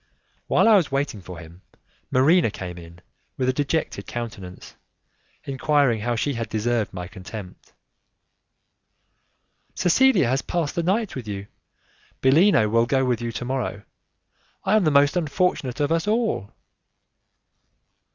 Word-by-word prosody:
While - - +3
I 220 -2 +7
was 170 -7 0
waiting 135 -7 -2
for 90 -1 -9
him, 85 +1 -13 0.5
Marina 150 +3 +4
came 90 -4 -7
in 85 +1 -14 0.4
with 130 -1 0
a - - +2
dejected 145 +3 -2
countenance, 105 -6 -7 0.7
enquiring 140 -3 +1
how 120 +3 -1
she 140 +5 -1
had 115 -2 -4
deserved 110 0 -1
my 90 -1 -6
contempt. 95 -1 -10 2.0
"Cecilia 220 - +4
has 130 +3 +1
passed 170 -4 -2
the 170 - -1
night 195 +5 0
with 125 -5 -6
you, 100 -1 -5 0.7
Bellino 140 - +4
will 115 +2 +2
go 130 +1 +2
with 125 -2 0
you 120 0 -3
to 120 - -5
morrow, 125 -5 -3 0.8
I 195 +2 +2
am 215 -4 +3
the - - +4
most 140 -1 +4
unfortunate 155 -5 -1
of 145 +1 0
us 165 +4 0
all." 220 - 0
130 Hz, 140 wpm, -23 LUFS, 110-160 Hz, 2.0 s, I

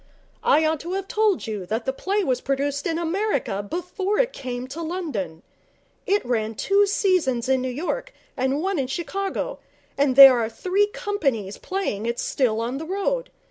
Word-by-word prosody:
'I 315 +1 +4
ought 315 -1 +1
to 345 +5 -5
have 390 0 -3
told 425 -5 +1
you 215 -4 -4
that 225 +3 -2
the 265 - 0
play 395 +8 -1
was 255 -6 0
produced 280 +4 -1
in 330 -1 -1
America 335 - -1
before 360 - -2
it - - +2
came 250 -1 -5
to 315 +5 -6
London. 295 - -4 0.6
It 405 -4 +2
ran 225 -2 -1
two 400 - +3
seasons 345 - +1
in 260 -1 +2
New 260 - -2
York 360 - -3 0.2
and 265 +4 0
one 385 -4 0
in 265 - -1
Chicago, 390 - -3 0.4
and 280 -2 +3
there 270 -2 +10
are 225 -1 0
three 380 - +1
companies 275 - -2
playing 300 - -3
it 235 0 -1
still 230 -5 0
on 245 +4 -3
the 320 - -5
road. 400 +7 -1
300 Hz, 180 wpm, -24 LUFS, 250-390 Hz, 0.6 s, there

